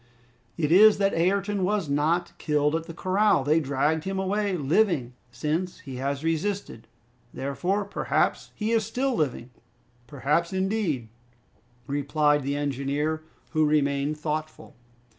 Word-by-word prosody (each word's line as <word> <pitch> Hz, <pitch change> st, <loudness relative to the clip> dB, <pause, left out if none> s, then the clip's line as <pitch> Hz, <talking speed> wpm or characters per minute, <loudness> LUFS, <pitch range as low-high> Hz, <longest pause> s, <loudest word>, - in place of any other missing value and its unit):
"It 155 Hz, -2 st, 0 dB
is 210 Hz, +4 st, +7 dB
that 195 Hz, 0 st, +1 dB
Ayrton 195 Hz, +3 st, +1 dB
was 200 Hz, -2 st, 0 dB
not 155 Hz, +5 st, 0 dB
killed 150 Hz, 0 st, +1 dB
at 165 Hz, 0 st, -3 dB
the 165 Hz, -, -7 dB
corral! 190 Hz, -3 st, +2 dB
That 145 Hz, -, -1 dB
they 160 Hz, -, +5 dB
dragged 150 Hz, +2 st, 0 dB
him 195 Hz, 0 st, -3 dB
away 195 Hz, 0 st, 0 dB
living, 150 Hz, -, +1 dB, 0.2 s
since 155 Hz, +9 st, -3 dB
he 135 Hz, -3 st, -8 dB
has 140 Hz, +2 st, -2 dB
resisted. 165 Hz, -, -2 dB, 0.5 s
Therefore, 180 Hz, +9 st, -1 dB
perhaps, 200 Hz, -, 0 dB
he 215 Hz, +1 st, -2 dB
is 225 Hz, -1 st, +3 dB
still 260 Hz, +4 st, -1 dB
living!" 130 Hz, -, -2 dB, 0.6 s
"Perhaps, 150 Hz, +7 st, 0 dB
indeed," 190 Hz, -, -1 dB, 0.8 s
replied 145 Hz, +1 st, +1 dB
the 140 Hz, +1 st, -2 dB
engineer, 145 Hz, +2 st, -1 dB, 0.3 s
who 155 Hz, -1 st, +2 dB
remained 145 Hz, 0 st, +1 dB
thoughtful. 155 Hz, 0 st, -5 dB
155 Hz, 135 wpm, -26 LUFS, 145-190 Hz, 0.8 s, is